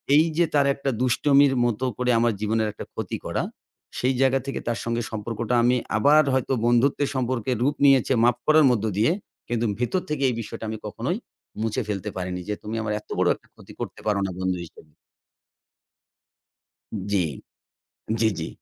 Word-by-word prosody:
এইযে 160 Hz, +2 st, +4 dB
তার 140 Hz, -1 st, +4 dB
একটা 140 Hz, 0 st, -3 dB
দুষ্টমির 140 Hz, +2 st, +4 dB
মত 120 Hz, 0 st, -1 dB, 0.2 s
করে 125 Hz, 0 st, +1 dB
আমার 120 Hz, 0 st, +2 dB
জীবনের 110 Hz, +1 st, +1 dB
একটা -, -, -8 dB
ক্ষতি -, -, -4 dB
করা। -, -, -1 dB, 0.6 s
সেই 130 Hz, +2 st, +2 dB
জায়গা 135 Hz, 0 st, +4 dB
থেকে 135 Hz, -, -3 dB
তার 115 Hz, -3 st, -1 dB
সঙ্গে 115 Hz, 0 st, -1 dB
সম্পর্কটা 115 Hz, +2 st, -2 dB
আমি 125 Hz, +1 st, +4 dB, 0.2 s
আবার 145 Hz, +7 st, +6 dB
হয়তো 130 Hz, 0 st, +1 dB
বন্ধুত্বের 135 Hz, +4 st, +3 dB
সম্পর্কে 130 Hz, -2 st, -1 dB
রূপ 145 Hz, +3 st, +2 dB
নিয়েছে 135 Hz, -2 st, +5 dB
মাফ 120 Hz, 0 st, +4 dB
করার 155 Hz, -1 st, +6 dB
মধ্য 110 Hz, -3 st, 0 dB
দিয়ে। 115 Hz, +10 st, +4 dB, 0.4 s
কিন্তু 120 Hz, 0 st, 0 dB
ভেতর 125 Hz, +9 st, 0 dB
থেকে 150 Hz, -2 st, -1 dB
এই 125 Hz, -, -2 dB
বিষয়টা 115 Hz, -, -8 dB
আমি 110 Hz, -, -4 dB
কখনোই 120 Hz, -, -2 dB, 0.4 s
মুছে 110 Hz, -1 st, 0 dB
ফেলতে 105 Hz, 0 st, -3 dB
পারিনি 90 Hz, 0 st, -3 dB
যে, -, -, +1 dB
তুমি 110 Hz, +2 st, -4 dB
আমার 105 Hz, -1 st, -2 dB
এত -, -, -24 dB
বড় -, -, +3 dB
একটা -, -, -24 dB
ক্ষতি -, -, -14 dB
করতে -, -, -6 dB
পারো 105 Hz, -2 st, +2 dB
না 95 Hz, -, -3 dB
বন্ধু 95 Hz, -1 st, 0 dB
হিসেবে। 80 Hz, -1 st, -17 dB, 2.2 s
জ্বী, 95 Hz, -4 st, +2 dB, 1.0 s
জ্বী, 110 Hz, -, +4 dB
জ্বী। 80 Hz, -, -3 dB
120 Hz, 170 wpm, -24 LUFS, 110-135 Hz, 2.2 s, আবার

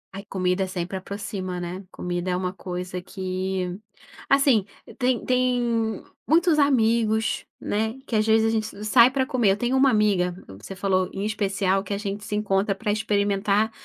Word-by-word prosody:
Ai, 195 Hz, -, -6 dB
comida 185 Hz, 0 st, 0 dB
sempre 180 Hz, 0 st, -4 dB
aproxima, 190 Hz, -1 st, -5 dB
né? 175 Hz, +2 st, -5 dB
Comida 175 Hz, 0 st, -3 dB
é 180 Hz, -, +1 dB
uma 185 Hz, 0 st, -2 dB
coisa 180 Hz, 0 st, -5 dB
que 185 Hz, 0 st, -3 dB, 0.5 s
assim, 275 Hz, -6 st, +4 dB, 0.4 s
tem 250 Hz, -1 st, +1 dB
tem 240 Hz, -3 st, +1 dB, 0.2 s
muitos 325 Hz, 0 st, +4 dB
amigos, 225 Hz, -5 st, +2 dB
né, 220 Hz, +4 st, -2 dB
que 235 Hz, -, -3 dB
às 215 Hz, -, +3 dB
vezes 220 Hz, 0 st, +4 dB
a -, -, +1 dB
gente 220 Hz, -1 st, -2 dB
s 205 Hz, +1 st, -7 dB
sai 235 Hz, +2 st, +7 dB
pra 260 Hz, 0 st, 0 dB
comer. 245 Hz, -6 st, +2 dB
Eu -, -, -4 dB
tenho 240 Hz, +4 st, 0 dB
uma 270 Hz, +1 st, +5 dB
amiga, 200 Hz, -6 st, +2 dB, 0.3 s
você 195 Hz, -, -8 dB
falou, 185 Hz, -1 st, +1 dB
em 195 Hz, +1 st, -4 dB
especial, 195 Hz, -2 st, 0 dB
que 200 Hz, 0 st, -3 dB
a -, -, -3 dB
gente 205 Hz, 0 st, -4 dB
se 210 Hz, -, -4 dB
encontra 200 Hz, -1 st, +1 dB
pra 210 Hz, +1 st, -2 dB
experimentar 205 Hz, 0 st, +1 dB
205 Hz, 175 wpm, -24 LUFS, 190-225 Hz, 0.5 s, sai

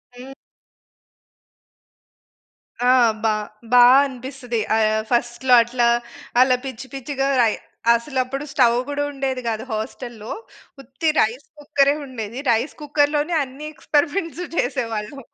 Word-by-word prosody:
హ్మ్. 255 Hz, +2 st, -10 dB, 2.5 s
ఆ! -, -, +4 dB, 0.3 s
బా, 220 Hz, -1 st, +3 dB, 0.4 s
బా 245 Hz, -1 st, +8 dB, 0.2 s
అనిపిస్తది. 255 Hz, -2 st, -5 dB, 0.2 s
ఆహ్, 215 Hz, 0 st, +2 dB
ఫస్ట్‌లో 240 Hz, +1 st, +1 dB
అట్లా 240 Hz, 0 st, 0 dB, 0.5 s
అలా 255 Hz, 0 st, +5 dB
పిచ్చి 260 Hz, 0 st, -7 dB
పిచ్చిగా 270 Hz, 0 st, -2 dB, 0.2 s
అయి 215 Hz, -, -1 dB, 0.4 s
అసలు 235 Hz, +4 st, -3 dB
అప్పుడు 270 Hz, +3 st, -5 dB
స్టవ్ 240 Hz, -5 st, +3 dB
గుడా 290 Hz, 0 st, -2 dB
ఉండేది 270 Hz, -2 st, -3 dB
గాదు 225 Hz, +1 st, -2 dB
హస్టల్‌లో. 220 Hz, 0 st, -6 dB, 0.5 s
ఉత్తి 270 Hz, +5 st, -2 dB
రైస్ 235 Hz, +6 st, 0 dB
కుక్కరే 285 Hz, -1 st, +2 dB
ఉండేది. 235 Hz, -2 st, -6 dB
రైస్ 235 Hz, +5 st, 0 dB
కుక్కర్‌లోనే 295 Hz, +2 st, +1 dB
అన్నీ 270 Hz, +3 st, -9 dB
ఎక్స్‌‌పరిమెంట్సు 330 Hz, +4 st, -1 dB
చేసేవాళ్ళం. 230 Hz, 0 st, -2 dB
260 Hz, 110 wpm, -21 LUFS, 235-280 Hz, 2.5 s, బా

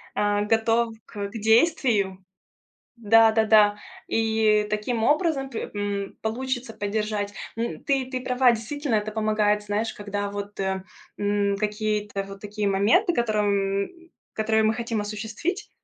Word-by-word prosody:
э, 205 Hz, 0 st, +1 dB
готов 225 Hz, +1 st, +2 dB
к 200 Hz, -1 st, -5 dB
действию. 220 Hz, -, +2 dB, 0.7 s
Да-да-да. 220 Hz, -2 st, +5 dB, 0.3 s
И 220 Hz, -1 st, +2 dB
таким 215 Hz, +2 st, -1 dB
образом 295 Hz, -1 st, +1 dB
п 230 Hz, -, -5 dB
м, 200 Hz, -1 st, -3 dB
получится 245 Hz, +1 st, -3 dB
поддержать. 210 Hz, -1 st, -2 dB, 0.2 s
М, 225 Hz, -9 st, -4 dB
ты 270 Hz, -2 st, +1 dB
ты 255 Hz, 0 st, -4 dB
права. 250 Hz, 0 st, +3 dB
Действительно, 235 Hz, +3 st, -2 dB
это 215 Hz, 0 st, -1 dB
помогает, 215 Hz, -1 st, +1 dB
знаешь, 210 Hz, +2 st, -2 dB
когда 205 Hz, 0 st, -3 dB
вот, 205 Hz, 0 st, -7 dB
э, 190 Hz, -1 st, -1 dB, 0.3 s
м, 205 Hz, -1 st, 0 dB
какие-то 210 Hz, -1 st, -1 dB
вот 195 Hz, 0 st, -10 dB
такие 210 Hz, 0 st, -3 dB
моменты, 215 Hz, -, +3 dB
которым 200 Hz, -4 st, 0 dB, 0.4 s
которые 220 Hz, 0 st, +1 dB
мы 220 Hz, +1 st, +3 dB
хотим 230 Hz, -2 st, -2 dB
осуществить, 220 Hz, -, -4 dB
215 Hz, 125 wpm, -25 LUFS, 205-230 Hz, 0.7 s, Да-да-да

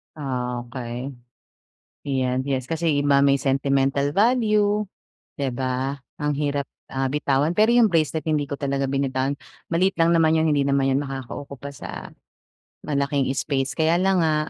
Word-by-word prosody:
Ah, 125 Hz, -4 st, -3 dB
okey. 120 Hz, +1 st, -6 dB, 1.0 s
Yan 130 Hz, -2 st, 0 dB
yes 130 Hz, -2 st, -1 dB
kasi 165 Hz, +4 st, -1 dB, 0.2 s
iba 140 Hz, -1 st, +4 dB
may 140 Hz, 0 st, +4 dB
sentimental 140 Hz, +1 st, +1 dB
value, 210 Hz, -2 st, +3 dB, 0.6 s
'di 140 Hz, -, 0 dB
ba? 130 Hz, +2 st, -1 dB, 0.2 s
Ang 150 Hz, 0 st, 0 dB
hirap, 145 Hz, -2 st, -1 dB, 0.2 s
ah, 135 Hz, 0 st, 0 dB
bitawan. 145 Hz, +3 st, +1 dB
Pero 215 Hz, +3 st, +4 dB
yung 240 Hz, -2 st, +6 dB
bracelet 160 Hz, -3 st, 0 dB
hindi 150 Hz, -2 st, +1 dB
ko 140 Hz, 0 st, -6 dB
talaga 140 Hz, -1 st, -1 dB
binitawan. 135 Hz, 0 st, -1 dB, 0.3 s
Maliit 185 Hz, +3 st, +2 dB
lang 165 Hz, 0 st, +3 dB
naman 160 Hz, -1 st, +4 dB
'yon 160 Hz, -1 st, +2 dB
hindi 140 Hz, -1 st, +2 dB
naman 135 Hz, -1 st, +2 dB
yon 135 Hz, -, +2 dB
makakaukupa 135 Hz, +1 st, -7 dB
sa 140 Hz, -, -8 dB, 0.7 s
malaking 140 Hz, -1 st, 0 dB
space. 135 Hz, 0 st, -1 dB
Kaya 160 Hz, +1 st, +2 dB
lang 190 Hz, +1 st, +2 dB
nga, 160 Hz, -2 st, +2 dB
140 Hz, 150 wpm, -23 LUFS, 135-160 Hz, 1.0 s, yung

